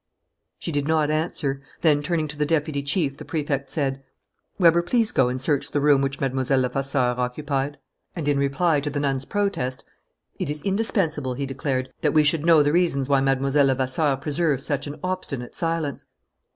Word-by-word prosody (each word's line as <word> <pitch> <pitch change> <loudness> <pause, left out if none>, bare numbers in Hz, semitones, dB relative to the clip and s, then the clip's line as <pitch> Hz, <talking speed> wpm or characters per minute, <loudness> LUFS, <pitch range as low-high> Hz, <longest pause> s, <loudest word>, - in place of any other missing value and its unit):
She 170 - -5
did 145 -1 -1
not 155 -1 +2
answer. 150 -3 -1 0.2
Then, 150 -3 +3
turning 155 0 -1
to 150 - -5
the 150 - 0
deputy 150 -2 0
chief, 140 -1 0
the 150 - -8
Prefect 145 -2 -2
said: 135 -3 -2 0.5
"Weber, 170 -3 +5
please 225 +5 +1
go 125 -2 +3
and 130 +1 -3
search 140 +1 0
the 145 - 0
room 145 -1 +4
which 135 0 -2
Mlle. 135 -2 0
Levasseur 130 -1 +1
occupied." 140 +2 -2 0.4
And, 160 -5 -4
in 145 -1 +2
reply 145 +3 +2
to 145 +1 -3
the 145 0 -3
nun's 135 -2 -1
protest: 195 -12 -2 0.6
"It - - -2
is 150 0 -4
indispensable," 180 - 0
he 140 +2 -3
declared, 130 -1 -3
"that - - +1
we 155 - +6
should 150 +1 +2
know 165 -3 +6
the 145 +1 +1
reasons 165 -6 +1
why 140 -1 +4
Mlle. 135 0 +1
Levasseur 135 +2 +1
preserves 145 0 0
such 145 -1 -1
an 145 - -7
obstinate 170 -9 -3
silence." 165 -4 -2
145 Hz, 180 wpm, -24 LUFS, 135-155 Hz, 0.6 s, we